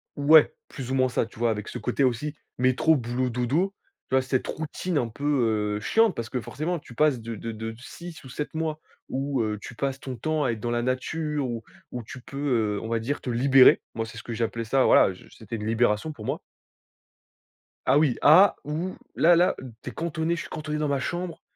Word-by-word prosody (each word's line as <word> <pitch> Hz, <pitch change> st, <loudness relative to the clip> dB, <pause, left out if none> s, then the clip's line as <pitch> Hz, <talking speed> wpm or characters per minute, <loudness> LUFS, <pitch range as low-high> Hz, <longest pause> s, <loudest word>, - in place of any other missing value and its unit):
Ouais, 155 Hz, -, +6 dB
plus 130 Hz, -3 st, -7 dB
ou -, -, +1 dB
moins 130 Hz, -1 st, +3 dB
ça, 120 Hz, -, 0 dB
tu 110 Hz, -, -15 dB
vois, 120 Hz, 0 st, +2 dB
avec 105 Hz, -1 st, -2 dB
ce -, -, -6 dB
côté 125 Hz, +3 st, 0 dB
aussi 130 Hz, +4 st, 0 dB, 0.2 s
métro, 130 Hz, +6 st, +4 dB
boulot, 125 Hz, 0 st, -1 dB
dodo. 135 Hz, +11 st, 0 dB, 0.4 s
Tu -, -, +1 dB
vois, 130 Hz, -, +5 dB
cette 130 Hz, 0 st, -1 dB
routine 160 Hz, +2 st, -3 dB
un 120 Hz, -, 0 dB
peu, 115 Hz, +5 st, -11 dB, 0.5 s
heu, -, -, -4 dB
chiante. 225 Hz, -, +3 dB
Parce 115 Hz, -1 st, -4 dB
que 130 Hz, -, -2 dB
forcément 155 Hz, +8 st, -3 dB
tu 145 Hz, -, -13 dB
passes 145 Hz, 0 st, +2 dB
de 115 Hz, 0 st, -6 dB
de 115 Hz, +2 st, -5 dB
de 110 Hz, +1 st, -5 dB
6 170 Hz, +6 st, -10 dB
ou 130 Hz, -, -11 dB
7 145 Hz, +3 st, -5 dB
mois 160 Hz, -1 st, -2 dB, 0.3 s
où, 135 Hz, -1 st, -1 dB
heu, 105 Hz, -1 st, -1 dB
tu 110 Hz, -, -9 dB
passes 135 Hz, +2 st, -2 dB
ton 130 Hz, -2 st, -6 dB
temps 155 Hz, +4 st, -1 dB
à 125 Hz, -, +2 dB
être 115 Hz, -, -4 dB
dans 120 Hz, -, -3 dB
la 120 Hz, 0 st, 0 dB
nature, 145 Hz, +3 st, -1 dB
où 115 Hz, -1 st, -4 dB, 0.3 s
où 125 Hz, -, -5 dB
tu 125 Hz, +4 st, -10 dB
peux, 120 Hz, -6 st, -1 dB
heu, -, -, -2 dB
on 110 Hz, -, -5 dB
va 115 Hz, 0 st, +1 dB
dire 135 Hz, +6 st, -3 dB
te 125 Hz, -, -3 dB
libérer. 130 Hz, +2 st, +6 dB
Moi, 115 Hz, -, -2 dB
c'est 115 Hz, 0 st, -9 dB
ce -, -, -10 dB
que 120 Hz, -, -5 dB
j'ai 115 Hz, +1 st, -1 dB
appelé 115 Hz, 0 st, -2 dB
ça 130 Hz, +4 st, +3 dB
voilà, -, -, +6 dB
heu, -, -, -4 dB
je -, -, -16 dB
c'était 110 Hz, +1 st, -7 dB
une 105 Hz, -1 st, -5 dB
libération 115 Hz, +4 st, +1 dB
pour 115 Hz, -8 st, -10 dB
moi. -, -, -2 dB, 1.5 s
Ah 130 Hz, -, +4 dB
oui, 145 Hz, -6 st, +3 dB
à 180 Hz, +6 st, +7 dB
où 160 Hz, +6 st, -3 dB, 0.2 s
là 170 Hz, +2 st, +6 dB
là, 175 Hz, +2 st, +3 dB, 0.3 s
tu -, -, -5 dB
es -, -, -10 dB
cantonné 165 Hz, 0 st, -1 dB
je -, -, -3 dB
suis -, -, -8 dB
cantonné 155 Hz, -1 st, -4 dB
dans 150 Hz, 0 st, 0 dB
ma 140 Hz, -2 st, 0 dB
chambre, 175 Hz, 0 st, -4 dB
130 Hz, 235 wpm, -26 LUFS, 115-155 Hz, 1.5 s, à